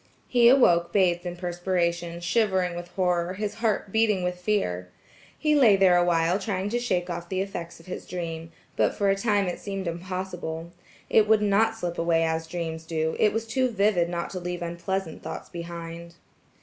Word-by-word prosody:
He 240 -2 +5
awoke 170 -10 +5
bathed 180 -2 +2
in 175 - -4
perspiration, 175 -1 -1
shivering 185 -1 +1
with 175 0 -6
horror, 180 -1 0
his 210 +1 -3
heart 210 -3 0
beating 215 -4 +2
with 180 0 -2
fear. 90 - -1 0.5
He 305 -1 +2
lay 250 -9 +6
there 190 -2 +5
a 175 - +4
while 170 +1 +2
trying 195 -1 -2
to 240 +3 0
shake 185 -8 -1
off 175 -1 -5
the 185 - -1
effects 175 -4 -5
of 165 - -17
his 185 - -7
dream, 165 -2 -5 0.2
but - - +2
for 200 -1 +2
a - - +2
time 205 -1 +1
it 180 - -3
seemed 195 -2 -4
impossible; 175 -1 -5 0.4
it 215 -1 +4
would 215 -1 +4
not 220 +2 +2
slip 175 -5 -4
away 165 -1 +2
as 160 0 -1
dreams 160 -1 -4
do; 160 -1 -1
it 210 - +4
was 225 +1 -2
too 255 +3 +1
vivid 200 -5 +2
not 170 -1 -3
to 185 - -4
leave 175 0 -4
unpleasant 170 0 -3
thoughts - - -7
behind. 170 0 -7
180 Hz, 190 wpm, -26 LUFS, 170-200 Hz, 0.5 s, lay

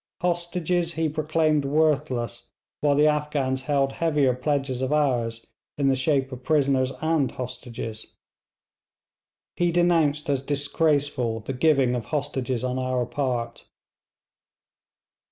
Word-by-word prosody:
Hostages 175 -1 0
he 160 -1 0
proclaimed 155 0 +1
worthless 140 -5 0 0.3
while 145 -1 +2
the 150 +1 +4
Afghans 150 -3 0
held 140 -1 +1
heavier 150 -5 +2
pledges 135 0 -1
of 130 +1 -1
ours 120 -6 0 0.3
in 140 -1 +2
the 135 - +3
shape 135 0 0
of 130 -1 -7
prisoners 135 -3 +2
and 160 -5 +2
hostages. 120 -3 -7 1.4
He 175 -1 +2
denounced 165 -4 +2
as 140 -2 +1
disgraceful 145 -4 0
the 135 - -5
giving 135 -2 +3
of 120 -3 -3
hostages 135 -3 -2
on 130 0 -1
our 130 -1 0
part. 120 -3 -3
140 Hz, 120 wpm, -25 LUFS, 130-155 Hz, 1.4 s, the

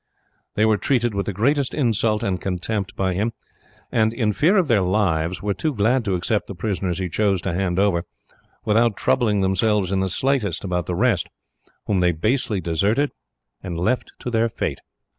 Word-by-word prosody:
They 105 - +3
were 110 -2 +3
treated 120 -4 +1
with 100 -2 -2
the - - 0
greatest 135 +8 +1
insult 110 -5 +1
and 95 -2 -1
contempt 95 +2 -3
by 95 -1 0
him, 105 +6 -1 0.6
and, 110 -1 +2
in 115 -3 0
fear 175 - +3
of 180 -4 +3
their 115 -6 +3
lives, 90 -3 0
were 105 -1 0
too 155 +6 -2
glad 120 +4 +2
to 95 -2 0
accept 100 +4 -1
the 100 - -7
prisoners 95 -2 -2
he 95 -1 -2
chose 100 +2 +1
to 95 - -2
hand 90 -1 -1
over, 95 -4 +2 0.6
without 115 0 +2
troubling 110 -6 +2
themselves 95 0 +1
in 95 - +1
the 95 0 0
slightest 125 - 0
about 90 -3 -2
the 90 - -2
rest, 105 -4 +1 0.6
whom 100 -3 +1
they 90 -1 +3
basely 110 - 0
deserted 100 - +1 0.5
and 85 -3 -5
left 120 +9 -1
to 125 - -4
their 115 0 +2
fate." - - -3
100 Hz, 185 wpm, -22 LUFS, 95-115 Hz, 0.6 s, They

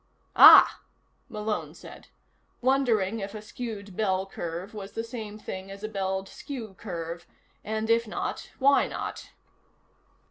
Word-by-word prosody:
"Ah," - - +9 0.5
Malone 215 -2 -3
said, - - -13 0.5
wondering 235 -6 +1
if 200 +1 -6
a 215 - -6
skewed 210 -3 -7
ball 190 -2 0
curve 175 +1 -6
was 200 -2 -8
the 225 - -3
same 225 -3 -7
thing 190 -2 -7
as 195 +1 -10
a - - -2
belled 190 -2 -3
skew 235 -3 -8
curve, 170 -2 -6 0.4
and 220 +1 -2
if 230 0 +2
not, 215 - -4
why 275 +1 +4
not? - - -6
210 Hz, 135 wpm, -27 LUFS, 190-225 Hz, 0.5 s, Ah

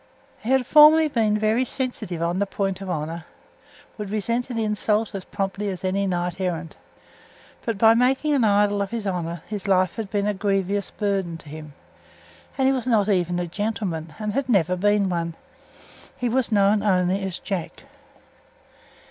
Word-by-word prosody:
He 225 - -6
had 265 -1 +3
formerly 310 +3 +7
been 220 -5 +1
very 215 +3 +2
sensitive 245 -11 -3
on 170 +2 0
the 200 - 0
point 195 -1 -2
of 195 - -6
honour; 165 0 -4 0.7
would 210 -2 -4
resent 230 +4 -1
an 240 - -4
insult 215 0 0
as 195 -2 -6
promptly 200 0 -3
as 185 0 -6
any 195 +1 0
knight 180 0 -2
errant; 170 -3 -3 0.9
but 230 -4 -2
by 225 +2 +6
making 260 +5 +2
an 270 -4 +2
idol 205 -1 +3
of 200 - -2
his 230 -2 -4
honour 170 -3 -3
his 210 -1 -6
life 185 -1 +2
had 220 -3 -4
been 205 -1 -1
a 210 - +1
grievous 195 0 -1
burden 195 -5 -2
to 155 - -14
him. 155 -1 -9 0.8
And 265 -1 +3
he 270 - +4
was 255 -2 -3
not 215 -4 +2
even 180 -3 +1
a 175 - -1
gentleman, 175 -4 -3
and 210 -1 -3 0.2
never 180 -6 +3
had 180 - -3
been 205 0 +3
one. 170 -2 -2 0.8
He 250 -3 -1
was 245 0 0
known 205 0 +3
only 190 -1 +1
as 190 -2 -3
"Jack." 190 -5 -5
200 Hz, 175 wpm, -23 LUFS, 180-220 Hz, 0.9 s, formerly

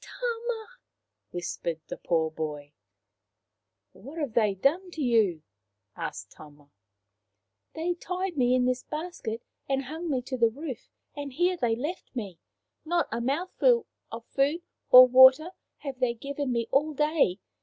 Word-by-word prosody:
" - - -17
Tama! 470 -2 -4 0.3
" - - -57
whispered 170 -2 -4
the - - -5
poor 160 -2 0
boy. 150 -2 -6 0.6
" 100 +1 -57
What 275 +10 -12
have 290 -8 -3
they 210 -4 +2
done 330 - +1
to 325 -3 -7
you? 215 -10 +2 0.3
" - - -55 0.2
asked - - -6
Tama. 145 -1 -16 0.5
" 100 -1 -53
They 335 +2 -1
tied 365 +1 -4
me 250 -2 +3
in 250 -1 +2
this 255 0 0
basket 300 -8 -5 0.3
and 270 0 0
hung 320 +5 -6
me 260 -4 -1
to 260 0 -4
the 230 -2 +4
roof, 270 0 -7 0.3
and 285 -1 -6
here 355 +5 +2
they 240 -9 0
left 295 +5 -6
me. 200 -8 -5 0.4
Not 340 +2 0
a 230 +1 -2
mouthful 365 - +1 0.3
of 230 0 -7
food 290 +5 0 0.3
or 255 -1 +11
water 260 +6 +7 0.3
have 270 -3 -6
they 245 -2 +1
given 280 +2 -4
me 235 -1 0
all 295 +2 +2
day. 300 - +2
260 Hz, 165 wpm, -27 LUFS, 220-320 Hz, 0.6 s, or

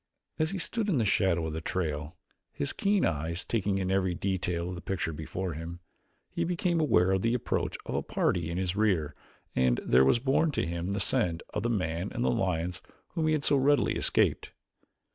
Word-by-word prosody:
As 155 0 +2
he 195 - -3
stood 215 +4 -1
in 170 - +2
the 115 - +2
shadow 95 -4 +2
of 80 - -3
the 80 - -4
trail, 80 -2 -3 0.3
his 70 - -2
keen 200 -1 +2
eyes 80 +2 -2
taking 100 -3 0
in 95 -1 -1
every 95 -2 +1
detail 90 -2 -1
of - - -4
the 85 - -7
picture 85 -4 -2
before 85 +4 -4
him, 85 +3 -7 0.5
he 170 - -1
became 175 0 0
aware 95 - +3
of 95 -1 +2
the 115 +3 +2
approach 125 - -1
of - - -4
a - - 0
party 85 -3 0
in 85 - -3
his 95 -1 -1
rear 95 -9 +1 0.4
and 65 -1 +3
there 65 +2 +5
was 65 - +4
borne 135 +6 +2
to - - 0
him 85 +3 -3
the 100 - -1
scent 85 -2 0
of 105 - -1
the 120 - 0
man 90 -3 -1
and 120 - -1
the - - +3
lions 90 -1 -1 0.3
whom 160 -3 -1
he 155 - +3
had 150 -2 0
so 145 - +3
readily 140 +2 +3
escaped. - - +1
95 Hz, 210 wpm, -29 LUFS, 85-120 Hz, 0.5 s, there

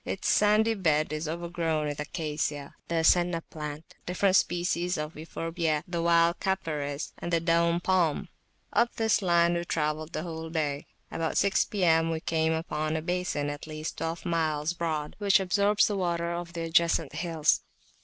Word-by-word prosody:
Its - - -3
sandy 215 +2 +4
bed 155 -7 +1
is 155 +1 -3
overgrown 165 -1 -2
with 145 -1 -4
Acacia, 150 -2 -3
the 165 -1 0
Senna 175 0 +4
plant, 150 -1 -8
different 185 +2 +2
species 175 0 +1
of 150 +1 -4
Euphorbiae, 165 0 -2
the 170 -1 -2
wild 170 0 +3
Capparis, 150 -6 -2
and 175 - -4
the 170 - +3
Daum 170 0 +2
Palm. 175 -4 +1 0.5
Up 235 0 +2
this 220 -1 +2
line 170 -2 +3
we 170 0 -1
travelled 155 -1 -2
the - - -3
whole 160 -2 -6
day. 150 -3 -2 0.2
About 165 -1 -2
six 200 -1 +3
P.M., 165 -5 +2
we 165 -1 -1
came 160 0 0
upon 155 -1 -2
a 160 - -1
basin 175 -4 -1
at 145 +1 -8
least 155 0 -6
twelve 165 +2 -4
miles 160 -2 0
broad, 160 -3 -3
which 200 -1 +4
absorbs 200 +2 +3
the 205 - -1
water 170 -2 -1
of 170 0 -5
the 170 - -4
adjacent 165 -2 +2
hills. 165 -1 +1
165 Hz, 165 wpm, -28 LUFS, 155-175 Hz, 0.5 s, sandy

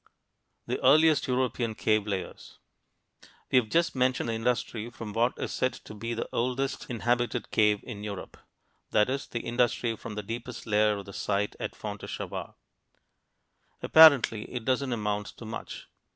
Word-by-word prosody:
THE - - -3
EARLIEST 155 -1 +5
EUROPEAN 125 -3 0
CAVE 110 -1 +1
LAYERS 95 -3 -5 0.9
We've 125 -4 +3
just 170 +5 +2
mentioned 130 -2 +1
the - - 0
industry 115 -1 -1
from 115 -3 -8
what 120 +3 +2
is - - -4
said 130 - 0
to - - -11
be 115 +3 -4
the 115 - -3
oldest 130 +3 -1
inhabited 120 0 -1
cave 105 -2 +3
in 105 -4 -8
Europe; 100 -3 -7 0.5
that 105 +3 +3
is, 135 +1 -3
the 120 - -4
industry 120 -1 0
from 110 0 -8
the 105 - -4
deepest 115 +3 -6
layer 105 -1 +2
of 100 - -7
the 100 - -10
site 105 +1 -1
at - - -4
Fontéchevade. - - -6 1.3
Apparently 140 -9 +6
it 125 -3 -5
doesn't 130 0 0
amount 105 -2 -2
to 115 - -9
much. 110 - -7
115 Hz, 150 wpm, -28 LUFS, 105-125 Hz, 1.3 s, Apparently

